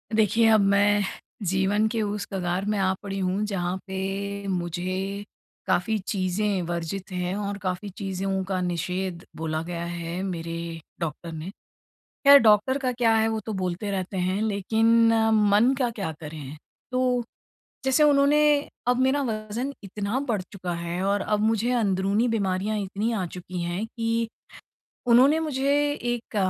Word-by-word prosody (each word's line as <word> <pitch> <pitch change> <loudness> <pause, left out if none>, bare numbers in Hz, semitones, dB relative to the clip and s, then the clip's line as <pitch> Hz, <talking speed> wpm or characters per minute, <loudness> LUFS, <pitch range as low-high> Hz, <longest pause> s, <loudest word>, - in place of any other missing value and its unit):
देखिए, 220 +1 +4
अब 220 - +6
मैं 200 +1 +4 0.4
जीवन 195 +3 +2
के 225 0 -1
उस 205 -1 -2
कगार 185 0 -1
में 210 - 0
आ 190 -1 +2
पड़ी 195 -1 -4
हूँ, 190 +3 0
जहाँ 185 -3 -2
पे 195 +1 -3
मुझे 185 +2 -2 0.4
काफ़ी 185 +4 +1
चीज़ें 195 0 0
वर्जित 175 +3 -4
हैं 180 0 -2
और 200 0 -3
काफ़ी 185 +1 -3
चीज़ों 195 -1 -2
का 190 -1 -1
निषेध 180 0 -2
बोला 155 -1 -2
गया 170 0 -4
है, 170 +1 -4
मेरे 165 -3 -4 0.4
डॉक्टर 165 0 -4
ने। 160 +3 -6 0.6
ख़ैर, 280 0 +6
डॉक्टर 220 +3 +4
का 260 -2 -1
क्या 235 -2 +2
है, 220 0 +3
वो 220 0 -1
तो 220 - -3
बोलते 185 +3 -2
रहते 190 0 -3
हैं। 185 +3 0
लेकिन 225 +2 +3 0.2
मन 210 +4 +4
का 250 -2 +2
क्या 200 -8 -4
करें? 150 -2 -7 0.4
तो 255 -1 +1 0.6
जैसे 265 +3 +4
उन्होंने 290 0 +5 0.5
अब 245 0 +3
मेरा 265 +2 +3
वज़न 225 +3 -3
इतना 205 +4 -2
बढ़ 210 -5 +1
चुका 185 -3 -4
है 170 +1 -3
और 200 +1 +1
अब 210 +1 0
मुझे 225 +2 +1
अंदरूनी 205 -1 +1
बीमारियाँ 205 -1 0
इतनी 200 +3 -2
आ 195 -5 -1
चुकी 180 +1 -6
हैं 175 +5 -2
कि 230 0 -1 0.8
उन्होंने 255 +6 +6
मुझे 280 -3 0 0.4
एक 240 -2 -6
200 Hz, 150 wpm, -25 LUFS, 185-225 Hz, 0.8 s, अब